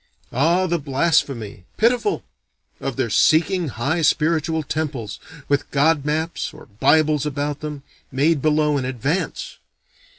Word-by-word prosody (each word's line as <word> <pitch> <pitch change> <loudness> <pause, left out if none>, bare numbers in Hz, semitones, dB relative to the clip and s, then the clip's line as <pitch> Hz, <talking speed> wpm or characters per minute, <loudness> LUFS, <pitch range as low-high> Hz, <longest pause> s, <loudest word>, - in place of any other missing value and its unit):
Ah, 170 +8 +2
the 170 -1 0
blasphemy 135 - 0
(pitiful!) 245 - +2 0.6
of - - -4
their - - -1
seeking 170 +2 +3
high 140 +7 -1
spiritual 160 0 +1
temples, 140 -8 -4 0.3
with 140 -1 0
god 145 0 +2
maps 160 +3 -2
or - - -13
bibles 150 +7 +2
about 145 0 -2
them, 150 -2 -6 0.3
made 145 +3 +2
below 150 -1 +2
in 130 - -3
advance! 130 - -3
150 Hz, 125 wpm, -21 LUFS, 140-160 Hz, 0.6 s, seeking